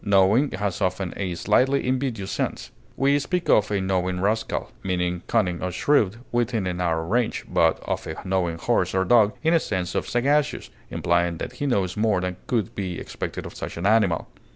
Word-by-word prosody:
Knowing 100 +7 +4
has 100 0 -2
often 95 -1 -1
a 95 -3 -3
slightly 135 +10 +2
invidious 125 -7 -1
sense. - - -3 0.3
We 140 +1 +3
speak 180 +4 -2
of 105 0 +4
a 100 -1 0
knowing 95 -1 0
rascal, 110 +4 -1
meaning 90 -2 -1
cunning 90 -7 +1
or 90 - -2
shrewd 110 0 +2 0.2
within 120 -4 0
a 90 - -1
narrow 85 -2 -1
range, 115 +6 0
but - - +2
of - - -3
a 80 - -4
knowing 90 -3 0
horse 85 - 0
or 95 0 +2
dog, 110 0 +5
in 160 +1 +3
the 165 - +5
sense 95 - -3
of - - -2
sagacious, 140 +5 +1 0.2
implying 85 -1 +1
that - - -5
he 145 - -3
knows 95 -8 0
more 105 -2 +2
than 90 0 -3
could 110 -6 -1
be 90 -3 -4
expected - - -5
of - - -8
such - - -6
an 85 - -3
animal. 105 -5 +3
95 Hz, 190 wpm, -24 LUFS, 90-120 Hz, 0.3 s, dog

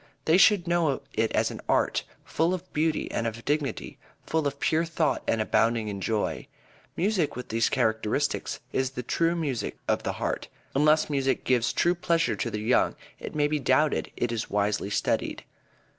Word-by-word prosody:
They 160 +2 +5
should 195 -2 +5
know 170 -6 +1
it 110 0 +1
as - - +1
an - - -8
art, - - +2 0.2
full 165 +3 +1
of 185 0 -11
beauty 155 +1 0
and 115 - -1
of 115 +1 -6
dignity; 145 -1 -2 0.3
full 160 -2 0
of 140 0 -5
pure 160 +1 +2
thought 165 -2 0
and 115 - +1
abounding 115 0 +1
in 100 -1 -5
joy. 110 +1 -1 0.5
Music 185 -4 +1
with 125 - -7
these 115 0 +2
characteristics 110 -1 0
is 130 -1 +1
the 125 -1 -6
true 165 +7 +1
music 145 -8 -2
of - - +1
the - - -2
heart. - - -3 0.3
Unless 150 +2 +3
music 135 -2 0
gives 120 -2 +2
true 175 - +2
pleasure 170 -7 +1
to 95 - -2
the 105 - -4
young 115 +4 +2 0.2
it - - -7
may 145 -1 +3
be 150 0 -1
doubted 140 +3 +2
if - - -22
it 120 - 0
is 115 -2 -3
wisely 105 0 0
studied. 105 - -1
140 Hz, 185 wpm, -27 LUFS, 115-160 Hz, 0.5 s, They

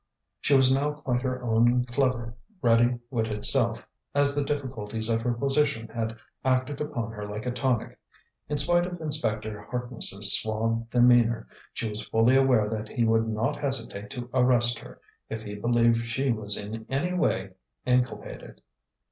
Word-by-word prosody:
She 145 - +2
was 130 -1 +5
now 145 +2 0
quite 130 -4 -2
her 130 -1 -3
own 120 +2 +3
clever, 120 -2 -1 0.3
ready 120 -2 +3
witted 110 -4 -2
self, 115 -4 +2 0.3
as 145 0 +3
the 145 0 0
difficulties 115 -6 -3
of 115 0 +1
her 120 +1 0
position 135 -2 0
had 115 0 -4 0.3
acted 130 +2 0
upon 120 -7 -3
her 105 -2 -7
like 105 +2 -6
a 125 - -1
tonic. 125 -2 -1 0.5
In 150 - -1
spite 175 +5 +3
of 175 -1 -7
Inspector 110 -9 -2
Harkness's 120 -5 +3
suave 115 +1 -2
demeanour, 120 -2 +4 0.3
she 115 - -3
was 105 0 -5
fully 115 +3 +3
aware 130 -5 +4
that 110 0 -4
he 120 - -1
would 115 0 +2
not 110 +1 -2
hesitate 115 -7 -3
to 125 -2 -6
arrest 120 -2 +3
her, - - -13 0.3
if 110 0 -5
he 105 -1 -7
believed 115 +2 +2
she 130 +3 0
was 105 -3 0
in 110 +2 -7
any 155 +7 -1
way 95 - 0 0.3
inculpated. 125 0 -2
120 Hz, 160 wpm, -27 LUFS, 110-130 Hz, 0.5 s, was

